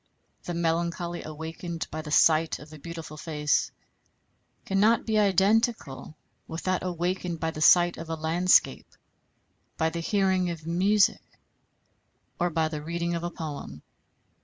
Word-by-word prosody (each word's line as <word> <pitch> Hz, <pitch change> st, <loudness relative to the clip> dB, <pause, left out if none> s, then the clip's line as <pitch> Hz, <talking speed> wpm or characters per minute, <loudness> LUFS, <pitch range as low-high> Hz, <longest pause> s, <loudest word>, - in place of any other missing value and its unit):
The 175 Hz, -, -4 dB
melancholy 170 Hz, +1 st, -1 dB
awakened 160 Hz, +2 st, -6 dB
by 155 Hz, -, -4 dB
the 155 Hz, -, -9 dB
sight 155 Hz, +1 st, +4 dB
of 150 Hz, +1 st, -13 dB
a 155 Hz, -, -11 dB
beautiful 165 Hz, -1 st, -8 dB
face 150 Hz, -2 st, 0 dB, 1.0 s
cannot 210 Hz, +4 st, +3 dB
be 220 Hz, -1 st, +1 dB
identical 200 Hz, -, +1 dB, 0.3 s
with 160 Hz, +1 st, -6 dB
that 185 Hz, -1 st, 0 dB
awakened 180 Hz, -1 st, -2 dB
by 160 Hz, 0 st, -1 dB
the 155 Hz, -, -7 dB
sight 175 Hz, +2 st, +5 dB
of 165 Hz, 0 st, -8 dB
a 165 Hz, -, -2 dB
landscape, 165 Hz, +3 st, +2 dB, 0.9 s
by 160 Hz, 0 st, +1 dB
the 170 Hz, -, -4 dB
hearing 190 Hz, 0 st, +1 dB
of 165 Hz, -2 st, -6 dB
music, 195 Hz, +6 st, +2 dB, 1.2 s
or 175 Hz, 0 st, +1 dB
by 160 Hz, -1 st, 0 dB
the 155 Hz, -1 st, -5 dB
reading 170 Hz, +2 st, -3 dB
of 170 Hz, -, -2 dB
a 175 Hz, -, -2 dB
poem. 145 Hz, -, -7 dB
170 Hz, 140 wpm, -27 LUFS, 160-180 Hz, 1.2 s, sight